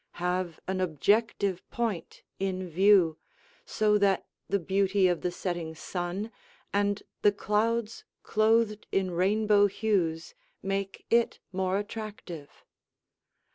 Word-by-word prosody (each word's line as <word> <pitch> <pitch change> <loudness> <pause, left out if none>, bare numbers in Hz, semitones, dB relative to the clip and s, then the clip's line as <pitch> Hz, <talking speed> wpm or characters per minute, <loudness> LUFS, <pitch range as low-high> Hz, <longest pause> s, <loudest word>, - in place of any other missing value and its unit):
Have 180 -1 -1
an 190 0 -1
objective 195 +3 +1
point 225 -8 -3 0.2
in 185 -1 -2
view, 180 -2 +4 0.5
so 210 -1 +2
that 195 -1 +2 0.2
the 200 - +2
beauty 195 +1 +2
of 175 -2 0
the 180 - 0
setting 175 -2 -4
sun 180 +6 -4 0.4
and 205 0 +1 0.2
the 205 - +5
clouds 215 +2 -1 0.2
clothed 215 0 +2
in 190 -1 +1
rainbow 205 +3 +3
hues 185 -6 -1 0.3
make 195 0 -3
it 235 0 +3
more 190 0 0
attractive. 205 -7 -7
195 Hz, 110 wpm, -29 LUFS, 180-210 Hz, 0.5 s, the